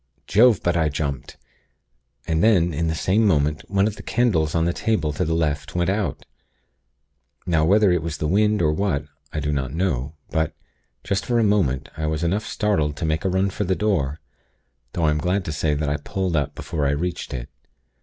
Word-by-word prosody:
Jove! 115 0 +4
but 85 -1 +1
I 80 -2 +2
jumped, 70 -3 -4 0.9
and 80 0 0
then, 90 -7 +4
in 80 +3 -1
the 80 - 0
same 95 +7 +2
moment, 75 -6 +2
one 100 0 +2
of 105 -1 -2
the - - -8
candles 90 -11 +1
on 80 0 +2
the 85 - +1
table 85 -10 0
to - - -1
the 80 +1 0
left 80 +1 -1
went 90 +1 +1
out. 100 -1 -2 1.2
Now 80 -3 +2
whether 100 +2 +4
it 90 - +2
was 80 -1 -4
the 75 - -1
wind, 105 +2 +2
or 75 - +3
what, 75 -6 -1 0.3
I 75 - -3
do 75 0 -1
not 65 0 -2
know; 75 -5 -1 0.2
but, 80 -1 0 0.5
just 100 0 -1
for 120 - 0
a 115 - +3
moment, 80 -10 +1
I 80 0 -2
was 80 +1 -1
enough 95 +6 0
startled 80 -9 0
to 80 - -2
make 80 +1 0
a 95 - +1
run 95 +1 +1
for 105 - -2
the 95 -1 0
door; 85 -10 0 0.7
though 85 - -1
I 75 - +4
am 75 - 0
glad 90 +3 0
to 80 - -3
say 75 0 0
that 75 0 -2
I 70 0 0
pulled 90 +4 -2
up, 70 -1 -1
before 75 -4 -2
I - - +2
reached 85 +4 -3
it. - - -5
80 Hz, 215 wpm, -23 LUFS, 75-95 Hz, 1.2 s, Jove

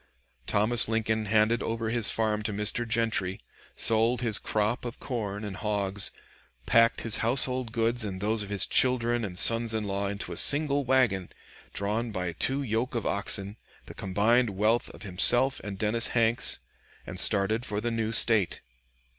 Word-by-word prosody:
Thomas 110 +3 +3
Lincoln 110 -1 -2
handed 110 +2 +1
over 115 0 -4
his 115 -3 0
farm 110 -1 -1
to 105 - -4
Mr. 105 +3 -3
Gentry, 110 -5 -2 0.4
sold 115 +2 +1
his 115 -4 +1
crop 110 +2 -2
of 120 -1 -8
corn 105 -5 -5
and 100 -2 -7
hogs, 100 -2 -2 0.6
packed 115 - +2
his 115 -2 +3
household 125 0 +1
goods 115 0 -1
and 95 -3 -6
those 110 +2 -2
of 100 - -7
his 100 -1 +4
children 120 -2 +2
and 90 -4 -6
sons 115 +2 +5
in 110 - -3
law 100 0 -3
into 100 -2 -6
a 85 - -7
single 145 +2 +3
wagon, 120 -8 0 0.4
drawn 110 +4 -3
by 90 -5 -4
two 135 - -1
yoke 120 +1 -3
of 115 - -3
oxen, 100 +1 -1 0.3
the - - -12
combined 110 +6 0
wealth 110 +4 0
of 85 - -13
himself 120 +8 +4
and 100 -2 -7
Dennis 110 +2 +3
Hanks, 115 0 +1 0.4
and - - -6
started 105 +3 +4
for 105 -4 -4
the 120 +2 -4
new 115 -1 -3
State. 110 -4 +2
110 Hz, 165 wpm, -26 LUFS, 100-120 Hz, 0.6 s, sons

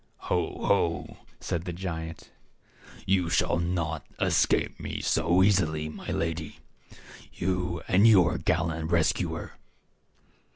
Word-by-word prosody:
"Ho, - - -1
ho!" - - 0 0.2
said 85 +1 -3
the 90 - -3
giant; 80 -3 -6 0.7
"you 90 -3 +2
shall 85 - +1
not 85 -3 -2 0.2
escape - - +1
me - - -5
so 90 +3 +2
easily, 80 -6 +2
my 75 - -10
lady 80 -2 -3 0.4
— - - -21 0.3
you 90 -2 -2
and 100 +5 +5
your 90 -6 +5
gallant 80 -1 -1
rescuer." 85 -2 0
85 Hz, 115 wpm, -27 LUFS, 80-90 Hz, 0.7 s, and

